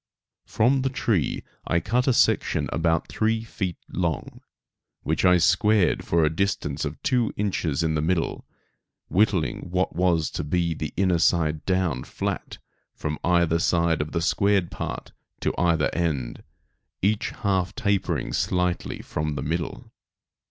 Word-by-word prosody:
From 130 Hz, +4 st, +2 dB
the 135 Hz, -, 0 dB
tree 110 Hz, -, 0 dB, 0.2 s
I 85 Hz, -, +2 dB
cut 125 Hz, +9 st, 0 dB
a 130 Hz, -, +4 dB
section -, -, +2 dB
about 80 Hz, -1 st, +1 dB
three 110 Hz, +1 st, 0 dB
feet 95 Hz, -6 st, -4 dB
long, 85 Hz, -5 st, -3 dB, 0.6 s
which -, -, 0 dB
I 90 Hz, 0 st, +6 dB
squared 90 Hz, +3 st, +3 dB
for 85 Hz, -1 st, +2 dB
a 80 Hz, +1 st, +1 dB
distance 80 Hz, -6 st, -1 dB
of 75 Hz, +1 st, -5 dB
two 125 Hz, -4 st, +1 dB
inches 85 Hz, -7 st, -1 dB
in 80 Hz, -1 st, +1 dB
the 75 Hz, -, 0 dB
middle, 85 Hz, +2 st, -1 dB, 0.6 s
whittling 95 Hz, -4 st, +1 dB
what 90 Hz, +1 st, 0 dB
was 85 Hz, -3 st, +2 dB
to -, -, -3 dB
be 85 Hz, +2 st, 0 dB
the 75 Hz, -1 st, -5 dB
inner 90 Hz, -3 st, +2 dB
side 80 Hz, -2 st, +2 dB
down 90 Hz, -9 st, 0 dB
flat -, -, -4 dB, 0.4 s
from 75 Hz, 0 st, -4 dB
either 85 Hz, -1 st, +3 dB
side 85 Hz, -1 st, +2 dB
of 75 Hz, -, -4 dB
the 85 Hz, -, -1 dB
squared 100 Hz, 0 st, +2 dB
part -, -, -5 dB, 0.3 s
to -, -, 0 dB
either 85 Hz, -5 st, +2 dB
end, 75 Hz, -8 st, -2 dB, 0.6 s
each 105 Hz, +4 st, +1 dB
half 95 Hz, -3 st, -1 dB
tapering 100 Hz, -2 st, -1 dB
slightly 90 Hz, -1 st, -1 dB
from 75 Hz, -1 st, -3 dB
the -, -, -3 dB
middle. 85 Hz, +3 st, -4 dB
85 Hz, 145 wpm, -25 LUFS, 80-100 Hz, 0.6 s, I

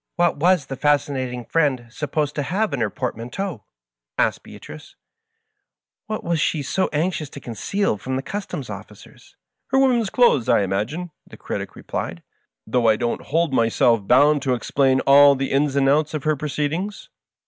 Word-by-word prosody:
" -, -, -58 dB
What 175 Hz, -2 st, +2 dB
was 175 Hz, 0 st, +3 dB
the 135 Hz, -, -6 dB
Fascinating 135 Hz, -3 st, 0 dB
Friend 140 Hz, -6 st, +1 dB
supposed 150 Hz, +2 st, -2 dB
to 150 Hz, -, -2 dB
have 195 Hz, +8 st, -1 dB
in 140 Hz, -, -2 dB
her 110 Hz, -, +1 dB
port 125 Hz, +4 st, -4 dB
manteau? 125 Hz, -, -5 dB, 0.3 s
" -, -, -68 dB
asked -, -, +1 dB
Beatrice, -, -, -12 dB, 0.6 s
" -, -, -60 dB
What 215 Hz, 0 st, -4 dB
was 170 Hz, -2 st, 0 dB
she 150 Hz, -3 st, 0 dB
so 185 Hz, +7 st, 0 dB
anxious 155 Hz, -1 st, -1 dB
to 140 Hz, -, -10 dB
conceal 135 Hz, -, -2 dB
from 130 Hz, +4 st, -4 dB
the 135 Hz, -, -3 dB
custom 205 Hz, +5 st, -5 dB
house -, -, -9 dB
officers?" -, -, -12 dB, 0.3 s
"Her 265 Hz, -, +1 dB
woman's 245 Hz, -6 st, +3 dB
clothes, 235 Hz, -, +3 dB
I -, -, +4 dB
im 95 Hz, -, -3 dB
agine," 150 Hz, -, -3 dB, 0.2 s
the -, -, -13 dB
Critic -, -, -5 dB
replied, -, -, -5 dB, 0.2 s
" -, -, -62 dB
though 125 Hz, -2 st, +1 dB
I 110 Hz, -, +5 dB
don't 120 Hz, +2 st, -2 dB
hold 165 Hz, -1 st, +1 dB
myself 115 Hz, -3 st, +2 dB
bound 145 Hz, +4 st, +5 dB
to 130 Hz, -2 st, +1 dB
explain 130 Hz, +2 st, +1 dB
all 140 Hz, 0 st, +7 dB
the 135 Hz, 0 st, -3 dB
ins 140 Hz, 0 st, +1 dB
and 135 Hz, -1 st, +3 dB
outs 150 Hz, +2 st, +2 dB
of 150 Hz, -, -4 dB
her 155 Hz, 0 st, +1 dB
proceedings." 150 Hz, +7 st, -3 dB
145 Hz, 190 wpm, -22 LUFS, 125-165 Hz, 0.6 s, all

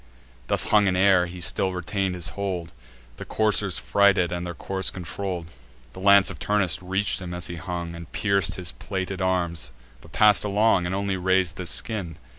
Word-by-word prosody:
Thus -, -, +3 dB
hung 105 Hz, -1 st, +5 dB
in 95 Hz, -, +1 dB
air, 90 Hz, -1 st, +4 dB
he 90 Hz, +1 st, -9 dB
still 95 Hz, +2 st, 0 dB
retain'd 90 Hz, +1 st, -2 dB
his 90 Hz, +1 st, -1 dB
hold, 95 Hz, -6 st, -5 dB, 0.4 s
The -, -, -7 dB
coursers 105 Hz, -4 st, +1 dB
frighted, 100 Hz, -4 st, +2 dB
and 90 Hz, 0 st, -4 dB
their 85 Hz, -, -6 dB
course 95 Hz, +2 st, -1 dB
controll'd. 90 Hz, +1 st, -5 dB, 0.5 s
The -, -, -10 dB
lance 100 Hz, 0 st, +5 dB
of 80 Hz, -, -10 dB
Turnus 100 Hz, -4 st, +1 dB
reach'd 95 Hz, +2 st, -1 dB
him 90 Hz, -1 st, -6 dB
as 90 Hz, -1 st, -2 dB
he 85 Hz, 0 st, -3 dB
hung, 85 Hz, 0 st, -5 dB
And 85 Hz, -1 st, -10 dB
pierc'd 100 Hz, -2 st, +1 dB
his 90 Hz, -3 st, -5 dB
plated 95 Hz, -1 st, -5 dB
arms, 90 Hz, -3 st, -1 dB, 0.3 s
but 85 Hz, -, -16 dB
pass'd 105 Hz, +2 st, +4 dB
along, 100 Hz, -3 st, +2 dB
And 95 Hz, -, -2 dB
only 100 Hz, -1 st, -2 dB
raz'd 95 Hz, -1 st, +1 dB
the 90 Hz, -, -6 dB
skin. 95 Hz, -5 st, 0 dB
95 Hz, 185 wpm, -24 LUFS, 90-100 Hz, 0.5 s, hung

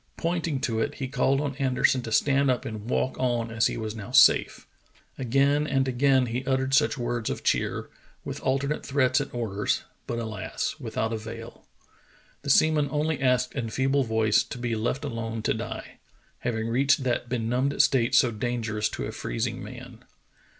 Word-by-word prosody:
Pointing 165 Hz, -4 st, -1 dB
to 115 Hz, -2 st, -1 dB
it, 110 Hz, -, -1 dB
he 135 Hz, -, -4 dB
called 135 Hz, 0 st, +1 dB
on 145 Hz, -1 st, -2 dB
Anderson 130 Hz, -1 st, +2 dB
to 115 Hz, -, -7 dB
stand 140 Hz, +3 st, +3 dB
up 125 Hz, -2 st, 0 dB
and 110 Hz, +1 st, -6 dB
walk 130 Hz, -, 0 dB
on 120 Hz, -2 st, 0 dB
as 115 Hz, 0 st, +2 dB
he -, -, -4 dB
was 110 Hz, -1 st, -4 dB
now 110 Hz, +1 st, -7 dB
safe. 130 Hz, +1 st, +5 dB, 0.5 s
Again 140 Hz, +4 st, +2 dB
and 135 Hz, -1 st, +1 dB
again 130 Hz, 0 st, +3 dB
he 120 Hz, +2 st, -3 dB
uttered 130 Hz, 0 st, 0 dB
such 135 Hz, -, +3 dB
words 120 Hz, -2 st, -2 dB
of -, -, -4 dB
cheer, -, -, 0 dB, 0.4 s
with -, -, -5 dB
alternate 140 Hz, +3 st, -1 dB
threats 130 Hz, -2 st, +2 dB
and -, -, -4 dB
orders, 105 Hz, -4 st, -1 dB, 0.2 s
but 120 Hz, -, -2 dB
alas! 110 Hz, -2 st, -3 dB
without 110 Hz, +1 st, -2 dB
avail. 115 Hz, +1 st, -8 dB, 0.7 s
The 140 Hz, -, -5 dB
seaman 150 Hz, +1 st, +4 dB
only 155 Hz, +1 st, -1 dB
asked 125 Hz, -1 st, +2 dB
in 120 Hz, -4 st, -3 dB
feeble 135 Hz, +4 st, +1 dB
voice 110 Hz, -2 st, +2 dB
to -, -, -7 dB
be 120 Hz, -1 st, -2 dB
left 120 Hz, +6 st, -2 dB
alone 115 Hz, -3 st, -4 dB
to -, -, +2 dB
die," -, -, -6 dB, 0.4 s
having 115 Hz, -2 st, -2 dB
reached 135 Hz, +4 st, +2 dB
that 120 Hz, -1 st, -1 dB
benumbed 125 Hz, +3 st, -1 dB
state 120 Hz, -4 st, +3 dB
so 125 Hz, -, +5 dB
dangerous 110 Hz, -2 st, -2 dB
to -, -, -4 dB
a -, -, -4 dB
freezing -, -, -3 dB
man. -, -, -10 dB
125 Hz, 175 wpm, -26 LUFS, 115-135 Hz, 0.7 s, safe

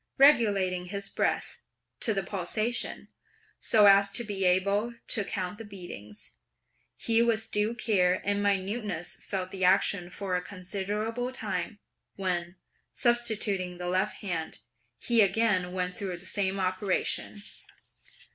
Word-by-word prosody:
Regulating 200 Hz, -10 st, +4 dB
his 200 Hz, +1 st, -4 dB
breath -, -, -1 dB, 0.4 s
(to 230 Hz, -, +1 dB
the 195 Hz, -2 st, 0 dB
pulsation) 215 Hz, +6 st, -1 dB, 0.5 s
so 215 Hz, -2 st, +4 dB
as 200 Hz, 0 st, +7 dB
to 220 Hz, +4 st, +1 dB
be 200 Hz, -3 st, -1 dB
able 200 Hz, +6 st, +2 dB
to 210 Hz, -, +2 dB
count 195 Hz, 0 st, -4 dB
the -, -, -6 dB
beatings, 175 Hz, -, -9 dB, 0.7 s
he 230 Hz, 0 st, +2 dB
with 225 Hz, -2 st, +1 dB
due 210 Hz, +3 st, +1 dB
care 185 Hz, -6 st, +2 dB
and 205 Hz, 0 st, +1 dB
minuteness 200 Hz, -2 st, -1 dB
felt 185 Hz, -2 st, -4 dB
the 190 Hz, -1 st, -4 dB
action 185 Hz, -1 st, +3 dB
for 185 Hz, 0 st, -3 dB
a 180 Hz, -, 0 dB
considerable 205 Hz, +6 st, -3 dB
time, 220 Hz, -3 st, -3 dB, 0.4 s
when, 175 Hz, -2 st, -2 dB, 0.4 s
substituting 220 Hz, -7 st, +1 dB
the 180 Hz, 0 st, -5 dB
left 185 Hz, +3 st, 0 dB
hand, 170 Hz, -5 st, -3 dB, 0.4 s
he 235 Hz, -2 st, +3 dB
again 200 Hz, -3 st, +2 dB
went 180 Hz, 0 st, -2 dB
through 190 Hz, -4 st, -4 dB
the 175 Hz, -, -14 dB
same 195 Hz, +1 st, 0 dB
operation. 185 Hz, +2 st, -1 dB
200 Hz, 130 wpm, -28 LUFS, 185-215 Hz, 0.7 s, as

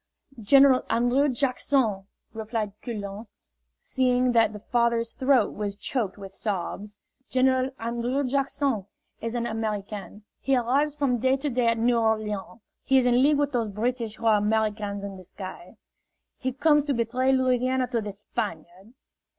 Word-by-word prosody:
"General 270 Hz, +4 st, +6 dB
An 240 Hz, +1 st, +2 dB
drrew 280 Hz, +4 st, +3 dB
Jack 255 Hz, 0 st, 0 dB
son," 220 Hz, -9 st, +1 dB, 0.3 s
replied 220 Hz, -2 st, -3 dB
Coulon, 210 Hz, -2 st, -6 dB, 0.5 s
seeing 255 Hz, -1 st, +1 dB
that 230 Hz, -3 st, +4 dB
the 210 Hz, -, -8 dB
father's 235 Hz, +1 st, 0 dB
throat 260 Hz, -5 st, +2 dB
was 205 Hz, -1 st, -3 dB
choked 215 Hz, -2 st, -2 dB
with 195 Hz, -1 st, -10 dB
sobs, 205 Hz, +1 st, -4 dB, 0.3 s
"General 260 Hz, 0 st, +2 dB
An 235 Hz, +1 st, -3 dB
drrew 260 Hz, +4 st, 0 dB
Jack 275 Hz, +1 st, 0 dB
son 270 Hz, -9 st, -1 dB, 0.3 s
is 230 Hz, +1 st, -3 dB
an 235 Hz, -1 st, -1 dB
American. 210 Hz, -2 st, -4 dB, 0.2 s
He 270 Hz, -, +1 dB
arrives 275 Hz, +5 st, +1 dB
from 270 Hz, -5 st, 0 dB
day 260 Hz, +3 st, +2 dB
to 280 Hz, +1 st, -3 dB
day 245 Hz, -1 st, +1 dB
at 230 Hz, 0 st, +2 dB
New 235 Hz, +1 st, +2 dB
Orleans. 215 Hz, -1 st, -1 dB, 0.2 s
He 270 Hz, -, +3 dB
is 255 Hz, -, +3 dB
in 245 Hz, 0 st, +4 dB
league 290 Hz, +2 st, +4 dB
with 290 Hz, 0 st, 0 dB
those 230 Hz, -4 st, -1 dB
British 225 Hz, +1 st, -2 dB
who 230 Hz, -, -8 dB
are 220 Hz, -2 st, +5 dB
Americans 210 Hz, -1 st, -1 dB
in 200 Hz, -1 st, -6 dB
disguise. 185 Hz, +1 st, -11 dB, 0.5 s
He 260 Hz, -2 st, -2 dB
comes 295 Hz, +3 st, +3 dB
to 285 Hz, -2 st, 0 dB
betray 245 Hz, +3 st, +1 dB
Louisiana 255 Hz, 0 st, +2 dB
to 235 Hz, -3 st, 0 dB
the 210 Hz, -1 st, -5 dB
Spaniard." 200 Hz, 0 st, -6 dB
235 Hz, 165 wpm, -26 LUFS, 210-260 Hz, 0.5 s, General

